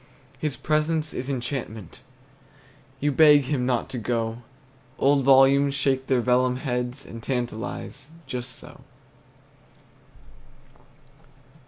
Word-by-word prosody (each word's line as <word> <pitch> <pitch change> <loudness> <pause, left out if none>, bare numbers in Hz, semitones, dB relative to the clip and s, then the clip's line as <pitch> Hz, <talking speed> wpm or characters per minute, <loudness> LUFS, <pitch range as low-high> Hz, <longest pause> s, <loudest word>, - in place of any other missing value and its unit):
His 150 -4 -2
presence 155 0 0
is 130 +2 -5
enchantment, 120 - -5 1.0
You 145 +1 +1
beg 145 0 +6
him 130 -2 -1
not 125 -2 0
to 125 - -4
go; 115 0 -2 0.6
Old 140 0 +3
volumes 135 +1 +5
shake 135 -1 0
their 130 -2 +2
vellum 125 +1 +2
heads 125 0 -3
And 115 - -9
tantalize, 125 +2 -4 0.2
just 125 -1 -6
so. - - -13
130 Hz, 105 wpm, -25 LUFS, 125-140 Hz, 1.0 s, beg